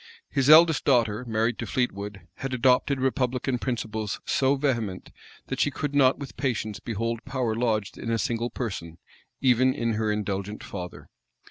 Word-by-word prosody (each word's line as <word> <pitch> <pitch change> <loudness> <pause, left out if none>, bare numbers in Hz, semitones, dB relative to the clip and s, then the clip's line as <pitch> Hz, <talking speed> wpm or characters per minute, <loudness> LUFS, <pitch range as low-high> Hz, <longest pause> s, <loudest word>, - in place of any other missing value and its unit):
His 135 0 +2
eldest 160 0 +7
daughter, 120 -4 +2
married 115 +1 0
to - - -4
Fleetwood, 100 -5 -2 0.2
had 135 -1 -3
adopted 130 +2 +3
republican 130 -1 0
principles 110 -4 -3
so 135 +1 +2
vehement, 120 -9 -2 0.3
that - - -4
she - - +3
could 145 +1 -4
not 135 -2 +4
with 140 -2 -8
patience 110 -6 -2
behold 115 +1 -3
power 130 -4 -1
lodged 110 -3 -1
in 115 - -4
a 115 - +1
single 115 +1 -1
person, 90 -10 -5 0.4
even 130 0 +4
in 115 -1 0
her 110 0 0
indulgent 105 0 -3
father. 90 -3 -7
120 Hz, 155 wpm, -26 LUFS, 110-130 Hz, 0.4 s, eldest